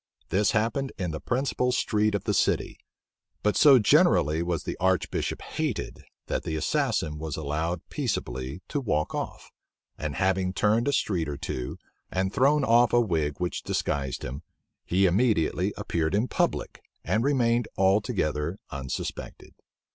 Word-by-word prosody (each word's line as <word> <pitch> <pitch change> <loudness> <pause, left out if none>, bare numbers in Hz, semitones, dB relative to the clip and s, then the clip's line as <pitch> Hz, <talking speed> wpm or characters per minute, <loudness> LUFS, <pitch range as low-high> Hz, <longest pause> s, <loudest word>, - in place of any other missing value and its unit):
This 100 +2 +2
happened 115 +5 0
in 90 -4 -2
the 80 - -4
principal 125 0 0
street 105 -4 +1
of 100 - -2
the - - 0
city; - - +1 0.6
but 105 - +2
so 140 -3 +8
generally 110 - +4
was 85 -2 -2
the - - -4
archbishop 95 -1 0
hated, - - -3 0.2
that - - -2
the 80 -2 -4
assassin 75 0 0
was 80 -2 -4
allowed 80 +3 -2
peaceably 65 +7 -3
to 145 - -1
walk 75 - -1
off; - - -5 0.5
and 75 -2 -3
having 95 +1 +1
turned 110 +5 +2
a - - +3
street 90 - 0
or 70 - -4
two, 60 -2 -4 0.3
and 95 +1 -1
thrown 140 +2 +3
off 120 -1 +4
a 120 - +6
wig 80 -10 0
which 90 -1 -2
disguised 70 -4 -2
him, 65 +4 -5 0.5
he 95 +2 +3
immediately 100 -2 +2
appeared 80 +2 -1
in 110 +5 +1
public, - - -1 0.2
and 105 +7 +1
remained 120 -4 +2
altogether 95 - +1
unsuspected. 65 -1 -6
95 Hz, 145 wpm, -27 LUFS, 80-115 Hz, 0.6 s, so